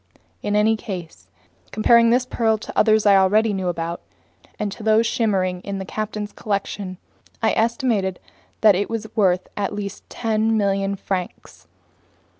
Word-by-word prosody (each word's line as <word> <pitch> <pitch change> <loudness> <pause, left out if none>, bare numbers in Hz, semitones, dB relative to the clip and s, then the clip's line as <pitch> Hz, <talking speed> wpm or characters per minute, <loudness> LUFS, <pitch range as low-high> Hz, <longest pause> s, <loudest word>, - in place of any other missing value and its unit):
In 205 - -1
any 215 +1 +4
case, 175 - -8 0.4
comparing 230 +2 +4
this 250 +2 +3
pearl 225 -3 +1
to 215 - -9
others 215 -1 +4
I 200 -1 +6
already 210 +3 +3
knew 190 -2 -2
about, 170 0 -3 0.6
and 210 -1 -2
to 205 - -9
those 220 +1 +3
shimmering 190 -6 0
in 200 +1 -5
the 190 - -5
captain's 210 +1 -4
collection, 200 -2 -4 0.5
I 220 - +4
estimated 225 -5 0 0.4
that 215 -2 +7
it 195 +2 -1
was 225 -1 -3
worth 185 -4 +2
at 205 0 -2
least 200 -1 -6
10,000,000 215 -3 0
francs. 185 - -5
205 Hz, 145 wpm, -22 LUFS, 190-220 Hz, 0.6 s, that